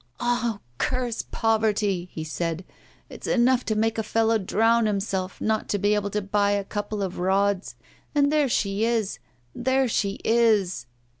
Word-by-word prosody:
'Ah! 240 Hz, -2 st, 0 dB, 0.2 s
curse 250 Hz, -3 st, -1 dB
poverty!' 210 Hz, -5 st, 0 dB
he 160 Hz, -, -5 dB
said. 165 Hz, +2 st, -3 dB, 0.4 s
'It's -, -, -9 dB
enough 250 Hz, +1 st, +3 dB
to 220 Hz, -, -1 dB
make 225 Hz, +1 st, 0 dB
a -, -, +2 dB
fellow 225 Hz, +1 st, +1 dB
drown 225 Hz, +3 st, +2 dB
himself 195 Hz, -2 st, -2 dB
not 220 Hz, 0 st, -1 dB
to 205 Hz, -, +1 dB
be 205 Hz, +1 st, +2 dB
able 205 Hz, -1 st, 0 dB
to 210 Hz, 0 st, -2 dB
buy 200 Hz, +1 st, +1 dB
a 200 Hz, 0 st, 0 dB
couple 205 Hz, +1 st, -4 dB
of 185 Hz, -2 st, -4 dB
rods! 195 Hz, +1 st, +1 dB, 0.4 s
And 285 Hz, 0 st, +3 dB
there 295 Hz, -3 st, +3 dB
she 200 Hz, -2 st, 0 dB
is, 225 Hz, -, 0 dB, 0.3 s
there 260 Hz, +1 st, +1 dB
she 200 Hz, -3 st, -1 dB
is! 215 Hz, -, +2 dB
210 Hz, 160 wpm, -25 LUFS, 195-230 Hz, 0.4 s, enough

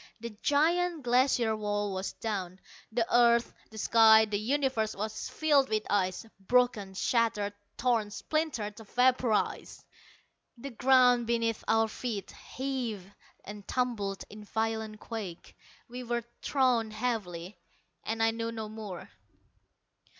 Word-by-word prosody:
The 230 Hz, -1 st, -7 dB
giant 330 Hz, +2 st, +2 dB
Glacier 245 Hz, -2 st, +3 dB
wall 205 Hz, -1 st, -2 dB
was 190 Hz, +1 st, -3 dB
down. 190 Hz, -4 st, -4 dB, 0.3 s
The 230 Hz, 0 st, +1 dB
earth, 235 Hz, 0 st, +4 dB, 0.2 s
the 220 Hz, -, -12 dB
sky, 220 Hz, 0 st, +6 dB
the 205 Hz, -1 st, -2 dB
universe 250 Hz, -2 st, 0 dB
was 215 Hz, +2 st, -4 dB
filled 290 Hz, -4 st, +2 dB
with 215 Hz, -1 st, 0 dB
ice, 190 Hz, +1 st, 0 dB
broken, 210 Hz, -2 st, +1 dB
shattered, 210 Hz, -2 st, +1 dB, 0.2 s
torn, 235 Hz, -4 st, +1 dB
splintered, 230 Hz, -4 st, -2 dB
vaporized! 245 Hz, 0 st, 0 dB, 0.7 s
The 275 Hz, +4 st, -7 dB
ground 250 Hz, -1 st, +4 dB
beneath 230 Hz, -1 st, 0 dB
our 225 Hz, 0 st, +3 dB
feet 220 Hz, -2 st, -5 dB
heaved 240 Hz, -8 st, -5 dB, 0.3 s
and 205 Hz, 0 st, -9 dB
tumbled 220 Hz, -6 st, -2 dB
in 210 Hz, 0 st, -11 dB
violent 220 Hz, 0 st, -3 dB
quake. 205 Hz, -7 st, -7 dB, 0.3 s
We 250 Hz, +1 st, -7 dB
were 240 Hz, 0 st, -2 dB, 0.2 s
thrown 250 Hz, -5 st, +2 dB
heavily 215 Hz, -6 st, -4 dB, 0.4 s
and 225 Hz, 0 st, -1 dB
I 225 Hz, -, +4 dB
knew 230 Hz, 0 st, -3 dB
no 220 Hz, -2 st, -5 dB
more.... 210 Hz, -4 st, -8 dB
225 Hz, 120 wpm, -30 LUFS, 210-245 Hz, 0.7 s, sky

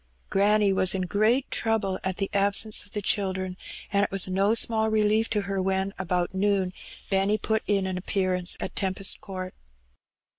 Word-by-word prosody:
Granny 205 Hz, 0 st, +3 dB
was 185 Hz, 0 st, +3 dB
in 185 Hz, -, -1 dB
great 215 Hz, +8 st, +1 dB
trouble 220 Hz, -4 st, 0 dB
at 190 Hz, 0 st, -2 dB
the 195 Hz, -, -1 dB
absence 200 Hz, +2 st, +2 dB
of -, -, -17 dB
the 210 Hz, -, -3 dB
children, 190 Hz, -2 st, -1 dB, 0.4 s
and 200 Hz, 0 st, +3 dB
it -, -, 0 dB
was 195 Hz, -1 st, +2 dB
no 195 Hz, +4 st, +2 dB
small 220 Hz, -1 st, +2 dB
relief 215 Hz, +1 st, +2 dB
to 210 Hz, -, 0 dB
her 195 Hz, -1 st, -2 dB
when, 190 Hz, +1 st, -1 dB
about 180 Hz, 0 st, -1 dB
noon, 190 Hz, -1 st, 0 dB, 0.4 s
Benny 195 Hz, +2 st, +2 dB
put 220 Hz, +1 st, 0 dB
in 200 Hz, -2 st, +1 dB
an 185 Hz, -1 st, -3 dB
appearance 185 Hz, -2 st, 0 dB
at -, -, -5 dB
Tempest 190 Hz, 0 st, -1 dB
Court. 185 Hz, -2 st, -7 dB
195 Hz, 175 wpm, -26 LUFS, 190-210 Hz, 0.4 s, Granny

